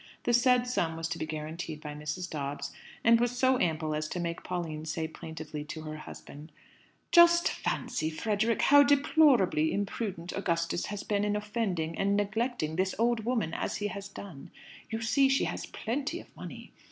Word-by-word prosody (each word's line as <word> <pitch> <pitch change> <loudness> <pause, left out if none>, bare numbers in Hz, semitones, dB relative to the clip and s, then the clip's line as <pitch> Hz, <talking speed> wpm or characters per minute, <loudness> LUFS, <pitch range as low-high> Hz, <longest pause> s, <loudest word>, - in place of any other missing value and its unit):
The 240 - +1
said 250 +1 +4
sum 165 -10 -1
was 165 0 -2
to - - -4
be 155 - -3
guaranteed 155 +1 -5
by 150 -1 -7
Mrs. 150 +4 -4
Dobbs, 140 -2 -4 0.3
and 230 0 +6
was 240 +1 0
so 260 0 +3
ample 155 -2 0
as 155 0 -2
to 180 - -4
make 170 0 -3
Pauline 165 -4 -4
say 160 +1 -2
plaintively 160 -1 -7
to 155 +1 -6
her 155 0 -6
husband, 150 0 -10 0.6
"Just 345 0 +7
fancy, 155 0 -2
Frederick, 215 +7 0
how 285 +1 +8
deplorably 280 - +4
imprudent 195 -3 -3
Augustus 170 -3 -1
has 205 -1 -5
been 205 -1 0
in 210 0 +1
offending 205 -6 -2
and 200 +1 +2
neglecting 205 -5 -1
this 190 +1 +1
old 230 -1 +1
woman 230 -9 0
as - - -2
he 205 +1 -2
has 200 +1 -6
done! 190 -8 -10 0.4
You 225 0 -3
see 270 +5 +4
she 270 - +3
has - - -3
plenty 285 +9 -3
of - - -15
money. - - -9
195 Hz, 175 wpm, -30 LUFS, 160-235 Hz, 0.6 s, how